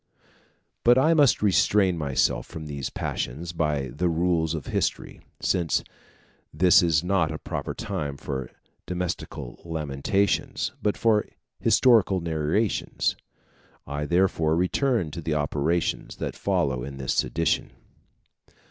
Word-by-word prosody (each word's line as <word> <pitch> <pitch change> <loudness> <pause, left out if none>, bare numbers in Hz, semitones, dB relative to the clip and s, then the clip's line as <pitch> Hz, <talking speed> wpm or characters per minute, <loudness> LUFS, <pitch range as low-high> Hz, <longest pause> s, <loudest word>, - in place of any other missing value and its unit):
But 120 +1 +6
I 155 +5 +4
must 145 -8 +4
restrain 100 -1 +3
myself 70 -5 0
from 80 -1 -8
these 70 -3 -4
passions 80 +7 -4
by 75 -5 -1
the 85 +8 -1
rules 85 -1 +1
of 75 - -5
history, - - -2 0.2
since 85 -4 +1 0.7
this 90 +4 +5
is 80 -3 +2
not 90 -3 +1
a 80 - -4
proper - - -5
time 70 -2 -4
for 65 -1 -5 0.4
domestical 90 -8 -4
lamentations, 80 +4 -1
but 105 - 0
for 110 -2 +2 0.3
historical 110 -7 +4
narrations; 85 +5 0 0.7
I 70 +1 -3
therefore 85 -3 +2
return 90 - +1
to 85 - -6
the 80 -1 -1
operations 75 +3 -1
that - - -4
follow 65 -3 0
in 70 +1 -7
this 65 -2 -1
sedition. 85 0 0
85 Hz, 120 wpm, -25 LUFS, 75-95 Hz, 0.7 s, But